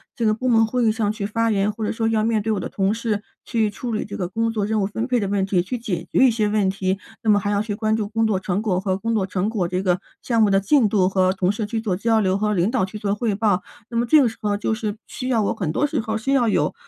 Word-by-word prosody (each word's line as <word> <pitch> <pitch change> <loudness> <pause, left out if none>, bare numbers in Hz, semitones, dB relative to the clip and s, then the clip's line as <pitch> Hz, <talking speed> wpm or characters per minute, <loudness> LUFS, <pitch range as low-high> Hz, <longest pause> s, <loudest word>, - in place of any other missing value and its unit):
这 235 - -1
个 215 - +4
部 255 +4 -3
门 225 -2 +4
会 245 +1 0
议 220 - +4
上 215 -2 0
去 215 -2 -4
发 230 +2 0
言， 200 0 +1
或 215 +1 -4
者 - - -1
说 225 0 -1
要 220 -1 +1
面 220 -1 +1
对 220 +2 -1
我 200 - -1
的 - - -4
同 195 +1 0
事 220 -3 -2 0.2
去 225 -3 +1
处 235 +4 -5
理 215 - -1
这 200 - -7
个 180 - -2
工 225 +4 -1
作 210 -3 -1
任 215 -1 0
务 195 - +1
分 225 +3 -3
配 250 -1 +1
的 200 - -1
问 195 -1 0
题， 185 -3 +1
去 245 +7 -4
解 180 -7 -4
决 - - +2
一 250 - +5
些 220 -2 0
问 205 -2 +1
题。 190 0 -1 0.2
那 220 - -1
么 205 -1 +5
还 205 +1 -2
要 205 0 +1
去 215 -1 -3
关 215 +1 0
注 215 -2 -2
工 225 0 +1
作 195 -3 +1
成 190 +2 -2
果 190 -5 0
和 190 -1 -1
工 230 +4 -2
作 210 -4 +1
成 190 +2 -1
果， 195 -6 -1
这 185 +1 -2
个 180 -1 +1 0.2
项 230 -2 +1
目 210 - +5
的 195 0 +4
进 220 +2 +3
度 195 -3 +3
和 185 -1 +2
同 185 -1 +1
事 210 +1 -3
去 225 +2 -3
做 195 -5 -1
交 225 +3 +2
流 190 -2 +1
和 210 +1 0
领 185 +1 +1
导 245 -8 +1
去 195 +3 -8
做 205 -1 -1
汇 220 -1 -1
报。 200 -3 +1 0.3
那 235 - -3
么 235 - +2
这 300 +5 +6
个 250 - +4
时 225 - -12
候， 205 -1 0
就 215 - -1
是 215 -2 -3
需 255 - -6
要 235 -4 +2
我 - - 0
很 165 -6 -2
多 290 - +1
时 - - -2
候 220 -1 -2
需 270 +5 -2
要 245 -4 +3
有， 215 - +1
215 Hz, 340 characters per minute, -22 LUFS, 195-225 Hz, 0.3 s, 这